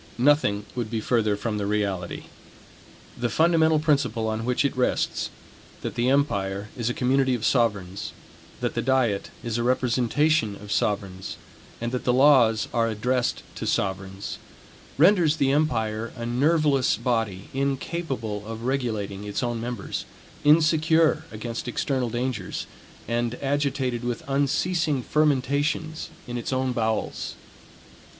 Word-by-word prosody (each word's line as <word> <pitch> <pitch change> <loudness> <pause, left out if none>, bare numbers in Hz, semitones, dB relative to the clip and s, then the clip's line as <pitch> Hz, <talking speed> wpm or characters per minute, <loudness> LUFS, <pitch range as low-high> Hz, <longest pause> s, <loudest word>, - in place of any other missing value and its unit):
Nothing 120 -6 +3
would 120 -3 -3
be 115 -1 -1
further 110 -2 +1
from 105 0 -2
the 100 - -2
reality. 100 -4 -2 0.9
The 120 0 -1
fundamental 160 +1 +4
principle 140 -7 +1
on 110 +1 -2
which 125 +3 +1
it 140 - 0
rests, 125 0 0 0.5
that - - -4
the 120 +2 +1
empire 100 -8 0
is 120 -1 -1
a - - 0
community 130 0 +2
of 115 - -3
sovereigns, 100 -6 0 0.5
that - - -1
the - - -1
diet 125 -6 +1
is 120 -1 -2
a - - 0
representation 125 0 +2
of 100 0 -10
sovereigns 95 -3 -1 0.4
and 120 0 -2
that 125 - -2
the 125 - +2
laws 125 -5 +5
are 115 -1 +2
addressed 120 +3 0
to - - -5
sovereigns, 95 0 -2 0.6
renders 165 -1 +5
the 135 -3 +2
empire 115 -7 0
a 120 -2 -5
nerveless 140 +2 +2
body, 115 -6 -1
incapable 135 -5 -2
of 115 0 -6
regulating 110 -6 -2
its 105 +4 -2
own 120 -2 -1
members, 120 +1 -4 0.4
insecure 160 +1 +4
against 115 +2 -5
external 125 0 -1
dangers, 120 -4 -3 0.4
and 120 0 -1
agitated 135 -3 -1
with 120 -1 -3
unceasing 145 +1 +1
fermentations 150 +2 0 0.2
in 120 -1 -4
its 120 - -4
own 130 0 0
bowels. 110 -3 -2
125 Hz, 135 wpm, -25 LUFS, 110-140 Hz, 0.9 s, laws